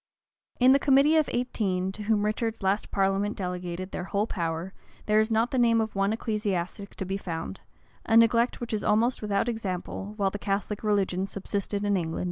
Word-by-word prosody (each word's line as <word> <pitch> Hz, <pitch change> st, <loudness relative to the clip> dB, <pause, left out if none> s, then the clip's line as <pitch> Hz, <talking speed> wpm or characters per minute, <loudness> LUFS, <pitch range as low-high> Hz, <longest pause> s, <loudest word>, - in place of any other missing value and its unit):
In 255 Hz, +1 st, +6 dB
the 275 Hz, -, +5 dB
committee 280 Hz, +3 st, +4 dB
of 310 Hz, -2 st, +3 dB
eighteen, 195 Hz, -7 st, -1 dB
to 210 Hz, -, -9 dB
whom 210 Hz, 0 st, +1 dB
Richard's 225 Hz, 0 st, -2 dB
last 195 Hz, +2 st, 0 dB
parliament 195 Hz, +1 st, 0 dB
delegated 180 Hz, 0 st, -4 dB
their 180 Hz, -, -4 dB
whole 200 Hz, +2 st, 0 dB
power, 170 Hz, -2 st, -3 dB, 0.3 s
there 210 Hz, 0 st, +3 dB
is 220 Hz, +1 st, +2 dB
not 225 Hz, +3 st, +1 dB
the 260 Hz, -, +1 dB
name 230 Hz, -1 st, +4 dB
of 220 Hz, -1 st, -2 dB
one 195 Hz, +1 st, +1 dB
ecclesiastic 205 Hz, -3 st, -3 dB
to 190 Hz, -, -4 dB
be 190 Hz, +1 st, -2 dB
found; 165 Hz, -, -5 dB, 0.5 s
a 225 Hz, -, +5 dB
neglect 230 Hz, +1 st, +4 dB
which 235 Hz, -2 st, -5 dB
is 210 Hz, -, -1 dB
almost 225 Hz, +4 st, +2 dB
without 205 Hz, 0 st, 0 dB
example, 205 Hz, -2 st, -4 dB
while 195 Hz, -2 st, +1 dB
the 205 Hz, -, -5 dB
Catholic 200 Hz, +1 st, -2 dB
religion 195 Hz, -3 st, +1 dB
subsisted 200 Hz, +1 st, -3 dB
in 205 Hz, 0 st, +2 dB
England. 165 Hz, -3 st, -2 dB
205 Hz, 190 wpm, -27 LUFS, 190-225 Hz, 0.5 s, In